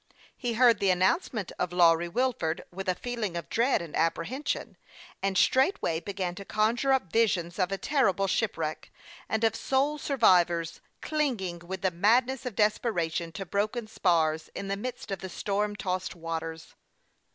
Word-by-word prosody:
He 240 Hz, -2 st, -2 dB
heard 235 Hz, -2 st, +5 dB
the 200 Hz, -, +2 dB
announcement 190 Hz, -, +1 dB
of 180 Hz, -1 st, -1 dB
Lawry 170 Hz, -1 st, +4 dB
Wil 255 Hz, +7 st, +1 dB
ford 160 Hz, -5 st, -3 dB
with 190 Hz, +2 st, -4 dB
a 180 Hz, -, +1 dB
feeling 220 Hz, -6 st, -3 dB
of 170 Hz, -, -6 dB
dread 235 Hz, -4 st, +2 dB
and 165 Hz, -, -8 dB
apprehension, 165 Hz, -, -1 dB, 0.5 s
and 195 Hz, -1 st, 0 dB
straightway 260 Hz, -, +2 dB
began 185 Hz, 0 st, -3 dB
to 200 Hz, -, -8 dB
conjure 225 Hz, +7 st, +1 dB
up 255 Hz, -11 st, +1 dB
visions 190 Hz, -6 st, +1 dB
of 185 Hz, 0 st, +1 dB
a 195 Hz, -, -1 dB
terrible 200 Hz, -8 st, +1 dB
shipwreck, 165 Hz, -6 st, -2 dB, 0.4 s
and 220 Hz, +1 st, 0 dB
of 225 Hz, 0 st, +3 dB
sole 280 Hz, +5 st, 0 dB
survivors, 175 Hz, -, +2 dB, 0.2 s
clinging 240 Hz, -, -1 dB
with 185 Hz, +3 st, -7 dB
the 190 Hz, -, +2 dB
madness 240 Hz, +8 st, +2 dB
of 235 Hz, -, -5 dB
desperation 175 Hz, -6 st, 0 dB
to 195 Hz, +2 st, -5 dB
broken 210 Hz, +5 st, -1 dB
spars, 160 Hz, -6 st, +1 dB
in 195 Hz, -, -5 dB
the 195 Hz, -, 0 dB
midst 240 Hz, +1 st, -6 dB
of 195 Hz, -, -2 dB
the 190 Hz, -, -6 dB
storm 205 Hz, +3 st, -1 dB
tossed 185 Hz, -3 st, -3 dB
waters. 165 Hz, -1 st, -5 dB
195 Hz, 165 wpm, -28 LUFS, 175-235 Hz, 0.5 s, heard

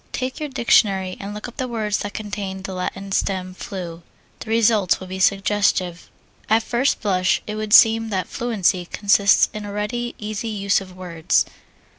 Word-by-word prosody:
Take 255 Hz, 0 st, -3 dB
your 300 Hz, -1 st, -4 dB
dictionary 195 Hz, -7 st, +2 dB
and 200 Hz, +1 st, -6 dB
look 210 Hz, +2 st, -6 dB
up 240 Hz, -, -12 dB
the 260 Hz, -, -2 dB
words 215 Hz, -4 st, -1 dB
that 205 Hz, -1 st, -5 dB
contain 200 Hz, -3 st, -5 dB
the 195 Hz, -, -5 dB
Latin 195 Hz, +2 st, -5 dB
stem 185 Hz, -1 st, -1 dB
flu 175 Hz, -3 st, -7 dB, 0.4 s
the -, -, -9 dB
results 220 Hz, -4 st, +3 dB
will 185 Hz, -, -8 dB
be 190 Hz, +1 st, -6 dB
suggestive. 195 Hz, -3 st, +1 dB, 0.4 s
At 220 Hz, +1 st, +3 dB
first 245 Hz, +5 st, 0 dB
blush 185 Hz, -3 st, +1 dB
it 210 Hz, -, -5 dB
would 215 Hz, 0 st, -4 dB
seem 225 Hz, 0 st, +6 dB
that 190 Hz, -4 st, -2 dB
fluency 200 Hz, -6 st, 0 dB
consists 200 Hz, 0 st, +4 dB
in 215 Hz, -, -6 dB
a 205 Hz, -, -6 dB
ready, 240 Hz, +4 st, -3 dB
easy 215 Hz, +1 st, -4 dB
use 200 Hz, -2 st, +1 dB
of 185 Hz, -1 st, -12 dB
words. 170 Hz, -3 st, 0 dB
205 Hz, 175 wpm, -21 LUFS, 190-220 Hz, 0.4 s, seem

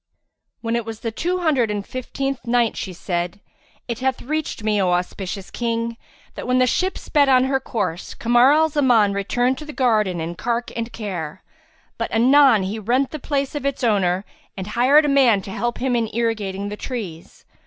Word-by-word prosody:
When 230 Hz, 0 st, -1 dB
it 235 Hz, -, 0 dB
was 225 Hz, -1 st, -8 dB
the 230 Hz, -, -2 dB
Two 355 Hz, +10 st, -2 dB
Hundred 275 Hz, -9 st, +2 dB
and 205 Hz, -1 st, -3 dB
Fifteenth 270 Hz, 0 st, -4 dB
Night, 235 Hz, -1 st, +2 dB
She 190 Hz, -, -4 dB
said, 175 Hz, +1 st, -3 dB, 0.5 s
It 235 Hz, -2 st, -3 dB
hath 260 Hz, 0 st, -1 dB
reached 305 Hz, -4 st, -3 dB
me, 210 Hz, -2 st, +1 dB
O 185 Hz, -, +2 dB
auspicious 180 Hz, +2 st, -3 dB
King, 230 Hz, -1 st, -2 dB, 0.4 s
that -, -, -7 dB
when 250 Hz, 0 st, +2 dB
the 255 Hz, -, +5 dB
ship 370 Hz, +10 st, 0 dB
sped 285 Hz, -3 st, +2 dB
on 255 Hz, -1 st, +5 dB
her 265 Hz, 0 st, +1 dB
course, 205 Hz, -9 st, -3 dB
Kamar 240 Hz, +3 st, +4 dB
al 315 Hz, +2 st, +4 dB
Zaman 245 Hz, -9 st, +3 dB
returned 245 Hz, +6 st, 0 dB
to 305 Hz, -, -8 dB
the 300 Hz, -, -8 dB
garden 215 Hz, -9 st, +1 dB
in 165 Hz, +1 st, -3 dB
cark 235 Hz, +6 st, -2 dB
and 230 Hz, 0 st, -3 dB
care; 185 Hz, -7 st, -5 dB, 0.6 s
but 230 Hz, -, -1 dB
anon 255 Hz, -2 st, +5 dB
he 200 Hz, +4 st, -3 dB
rented 250 Hz, +6 st, +1 dB
the 310 Hz, -, -5 dB
place 280 Hz, -2 st, 0 dB
of 290 Hz, -, -4 dB
its 280 Hz, -1 st, -2 dB
owner 195 Hz, -4 st, +2 dB, 0.3 s
and 190 Hz, +1 st, -5 dB
hired 275 Hz, +6 st, +5 dB
a -, -, +1 dB
man 255 Hz, -8 st, +4 dB
to 195 Hz, -, -8 dB
help 240 Hz, +4 st, -2 dB
him 255 Hz, 0 st, 0 dB
in 230 Hz, -2 st, 0 dB
irrigating 205 Hz, -4 st, -1 dB
the 210 Hz, -, -5 dB
trees. 200 Hz, -12 st, -7 dB
235 Hz, 195 wpm, -21 LUFS, 205-265 Hz, 0.6 s, the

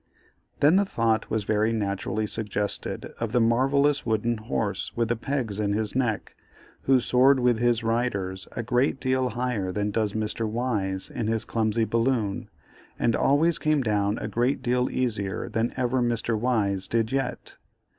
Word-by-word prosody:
Then 155 Hz, +6 st, +6 dB
the 200 Hz, -, +4 dB
thought 115 Hz, -, 0 dB
was 110 Hz, -1 st, -1 dB
very 110 Hz, +2 st, +1 dB
naturally 105 Hz, 0 st, -1 dB
suggested 105 Hz, -1 st, -3 dB
of 115 Hz, -1 st, -3 dB
the 125 Hz, -, +4 dB
marvellous 135 Hz, +5 st, +3 dB
wooden 115 Hz, +1 st, 0 dB
horse 70 Hz, -12 st, -2 dB
with 115 Hz, -1 st, 0 dB
the 120 Hz, -, +2 dB
pegs 120 Hz, -4 st, -3 dB
in 100 Hz, -1 st, 0 dB
his 110 Hz, +1 st, -1 dB
neck, 120 Hz, -5 st, -1 dB, 0.5 s
who 135 Hz, -1 st, +5 dB
soared 130 Hz, +3 st, +4 dB
with 120 Hz, -2 st, +2 dB
his 120 Hz, -1 st, +2 dB
riders 105 Hz, -5 st, -1 dB
a 120 Hz, -, -3 dB
great 125 Hz, +3 st, +1 dB
deal 130 Hz, -1 st, +1 dB
higher 120 Hz, -5 st, -2 dB
than 105 Hz, +2 st, -1 dB
does 105 Hz, -1 st, 0 dB
Mr. 110 Hz, +1 st, -2 dB
Wise 105 Hz, -5 st, -2 dB
in 110 Hz, -, -3 dB
his 110 Hz, 0 st, 0 dB
clumsy 110 Hz, 0 st, 0 dB
balloon, 115 Hz, -2 st, 0 dB, 0.5 s
and 115 Hz, -1 st, +1 dB
always 155 Hz, +4 st, +3 dB
came 155 Hz, -3 st, +1 dB
down 105 Hz, -1 st, +1 dB
a -, -, -4 dB
great 125 Hz, +4 st, 0 dB
deal 125 Hz, +1 st, +1 dB
easier 105 Hz, -7 st, -2 dB
than 115 Hz, +1 st, -1 dB
ever 130 Hz, 0 st, +1 dB
Mr. 120 Hz, -1 st, 0 dB
Wise 105 Hz, -5 st, 0 dB
did 115 Hz, -1 st, 0 dB
yet. 135 Hz, -1 st, -3 dB
115 Hz, 165 wpm, -26 LUFS, 105-125 Hz, 0.5 s, Then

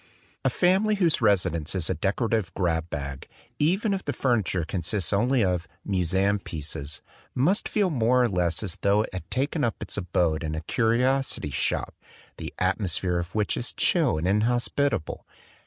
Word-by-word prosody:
A -, -, +3 dB
family 195 Hz, +4 st, +2 dB
whose 170 Hz, -9 st, +2 dB
residence 90 Hz, -7 st, +1 dB
is 85 Hz, -3 st, 0 dB
a -, -, +1 dB
decorative 100 Hz, +3 st, 0 dB
grab 85 Hz, -3 st, 0 dB
bag, 70 Hz, -3 st, -5 dB, 0.3 s
even 195 Hz, +8 st, +2 dB
if 195 Hz, -, -3 dB
the 145 Hz, -, -2 dB
furniture 105 Hz, -, 0 dB
consists 95 Hz, +3 st, -1 dB
only 120 Hz, +4 st, +3 dB
of 90 Hz, -2 st, 0 dB, 0.2 s
"museum 95 Hz, +2 st, +1 dB
pieces," 75 Hz, -4 st, -4 dB, 0.3 s
must 165 Hz, -, +1 dB
feel 200 Hz, -4 st, +1 dB
more 125 Hz, -1 st, +3 dB
or -, -, +3 dB
less 90 Hz, -2 st, 0 dB
as 95 Hz, -5 st, -3 dB
tho 100 Hz, +2 st, +2 dB
it -, -, -6 dB
had 95 Hz, -, -6 dB
taken 145 Hz, +4 st, -1 dB
up 115 Hz, -3 st, +1 dB
its -, -, -5 dB
abode 85 Hz, -4 st, 0 dB
in 80 Hz, -1 st, -3 dB
a 80 Hz, -, -3 dB
curiosity 120 Hz, -, 0 dB
shop, -, -, -1 dB, 0.4 s
the -, -, -6 dB
atmosphere 90 Hz, -2 st, 0 dB
of 85 Hz, +2 st, -6 dB
which 105 Hz, -2 st, +1 dB
is -, -, -2 dB
chill -, -, +2 dB
and 80 Hz, +3 st, -1 dB
in 100 Hz, +3 st, +3 dB
hospitable. 120 Hz, -, 0 dB
100 Hz, 170 wpm, -26 LUFS, 85-125 Hz, 0.4 s, A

